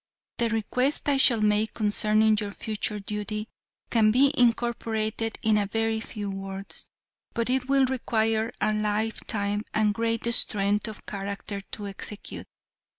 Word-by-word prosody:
The 235 -1 +2
request 250 +7 0
I 280 - +3
shall 240 -4 +4
make 210 +1 +2
concerning 215 0 +3
your 205 -1 -2
future 210 -1 -2
duty 210 +1 -4 0.4
can 220 -2 +5
be 270 +6 +4
incorporated 225 -2 +1
in 215 -1 +4
a 200 - 0
very 225 +1 0
few 215 -2 -6
words, 195 0 -3 0.5
but 235 +1 0
it 260 0 0
will 275 -1 +5
require 225 -3 0
a 215 - +1
lifetime 210 -1 -1
and 210 -1 +3
great 230 +1 -1
strength 205 0 +3
of 215 -1 -9
character 200 0 -5
to 205 +1 -8
execute. 200 +1 -7
215 Hz, 140 wpm, -27 LUFS, 210-230 Hz, 0.5 s, can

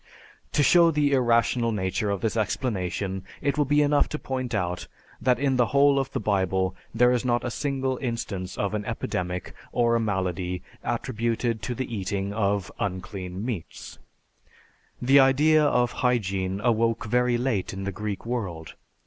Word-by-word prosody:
To 145 - +3
show 170 +2 +6
the 150 -2 +2
irrational 120 -2 +2
nature 95 0 -1
of 100 -2 -1
this 110 - -1
explanation, 95 -4 -2 0.2
it 140 - 0
will 150 - +2
be 145 +2 +3
enough 145 0 +2
to 150 - -3
point 130 -4 -3
out 90 -2 -2 0.3
that 125 -2 +3
in 135 0 +1
the 120 -2 +3
whole 140 0 +4
of 135 0 -2
the - - -2
Bible 95 -2 0 0.2
there 125 +2 +4
is 125 -1 +1
not 120 -1 +1
a 120 - -2
single 135 -1 -1
instance 110 -7 -4
of 100 0 -1
an 105 -1 -1
epidemic 90 0 -3 0.2
or 120 -1 +2
a - - +3
malady 95 -4 -2 0.2
attributed 115 -1 -1
to 125 - -3
the 120 -1 -4
eating 100 0 -2
of 100 -4 0
unclean 95 0 -4
meats; 110 -10 -6 1.0
the 135 +3 +5
idea 150 +4 +5
of 125 -4 +2
hygiene 95 -6 0
awoke 115 0 +1
very 125 +2 +2
late 120 -6 -1
in 95 0 -6
the 100 - -2
Greek 105 +1 -5
world. 95 -10 -4
115 Hz, 165 wpm, -26 LUFS, 95-130 Hz, 1.0 s, show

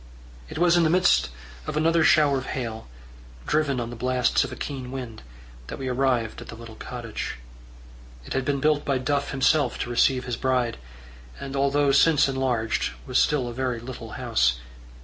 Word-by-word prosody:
It - - -7
was 175 +1 +4
in 170 - +4
the 160 - +3
midst 180 - +3 0.4
of - - -3
another 165 +1 +3
shower 145 -3 +4
of 130 - -8
hail, 115 - -5 0.6
driven 150 -4 +1
on 120 0 -4
the - - -7
blasts 125 +1 +1
of - - -5
a - - -6
keen 130 -3 -5
wind, 125 -4 -7 0.5
that - - -6
we 135 - -5
arrived 125 -3 0
at - - -10
the - - -8
little 115 0 -11
cottage. 115 0 -6 0.9
It - - -6
had 135 - 0
been 140 +1 0
built 150 0 +2
by 140 -2 0
Duff 140 +2 -1
himself 140 +3 +2
to 120 - -4
receive 125 +1 +2
his 125 -2 -3
bride, 125 -3 0 0.6
and 140 0 -6
although 140 +1 +2
since 145 +2 +5
enlarged, 130 -4 -1
was 130 -2 +1
still 140 -5 +2
a 120 - -5
very 125 -1 -2
little 120 -2 -8
house. 115 - +1
130 Hz, 185 wpm, -25 LUFS, 120-145 Hz, 0.9 s, since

